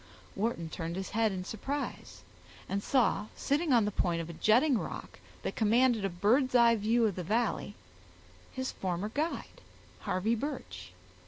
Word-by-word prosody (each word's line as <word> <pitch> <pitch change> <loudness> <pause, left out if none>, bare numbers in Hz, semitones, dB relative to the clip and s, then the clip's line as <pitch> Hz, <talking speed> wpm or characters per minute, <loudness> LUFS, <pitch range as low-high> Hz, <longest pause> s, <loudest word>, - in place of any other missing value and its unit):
Wharton 200 -5 -1
turned 165 +1 -5
his 190 0 -5
head 220 0 +2
in 185 -1 -4
surprise, 275 +8 -5 0.4
and 200 +1 -1
saw, 225 -4 +2
sitting 300 +2 0
on 235 -4 +5
the 210 - -1
point 175 -4 0
of 165 0 -5
a - - -9
jutting 240 - +3
rock - - -7 0.2
that - - -3
commanded 230 0 +3
a 195 - +1
bird's 240 +9 +2
eye 235 -1 +6
view 225 +2 +2
of 205 -4 0
the 180 - -4
valley, 225 +7 -1 0.8
his 260 0 -3
former 185 +2 -3
guide, 305 +8 -3 0.4
Harvey 190 +5 0
Birch. 280 +6 -5
220 Hz, 160 wpm, -31 LUFS, 190-250 Hz, 0.8 s, eye